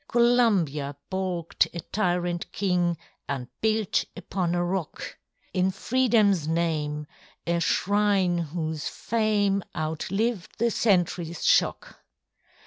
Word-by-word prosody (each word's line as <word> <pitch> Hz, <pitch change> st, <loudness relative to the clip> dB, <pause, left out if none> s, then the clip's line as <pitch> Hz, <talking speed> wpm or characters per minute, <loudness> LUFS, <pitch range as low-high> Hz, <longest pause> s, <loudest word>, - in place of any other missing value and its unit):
Columbia 205 Hz, -, +2 dB, 0.2 s
baulked 185 Hz, -3 st, 0 dB
a -, -, -3 dB
tyrant 175 Hz, -1 st, -1 dB
king, 180 Hz, -3 st, +1 dB, 0.3 s
And 125 Hz, -3 st, -3 dB
built 220 Hz, -2 st, +1 dB
upon 175 Hz, -3 st, -2 dB
a 175 Hz, 0 st, +1 dB
rock, 180 Hz, -3 st, -4 dB, 0.3 s
In 185 Hz, 0 st, +2 dB
FreedomŌĆÖs 210 Hz, -, +2 dB
name, 155 Hz, -3 st, -1 dB, 0.4 s
a 170 Hz, 0 st, +1 dB
shrine 195 Hz, 0 st, +2 dB
whose 160 Hz, -1 st, -3 dB
fame 210 Hz, -3 st, +1 dB
Outlived 180 Hz, +7 st, -2 dB
the 235 Hz, +1 st, +2 dB
centuryŌĆÖs 175 Hz, -6 st, +1 dB
shock. -, -, +2 dB
180 Hz, 100 wpm, -26 LUFS, 165-205 Hz, 0.4 s, Columbia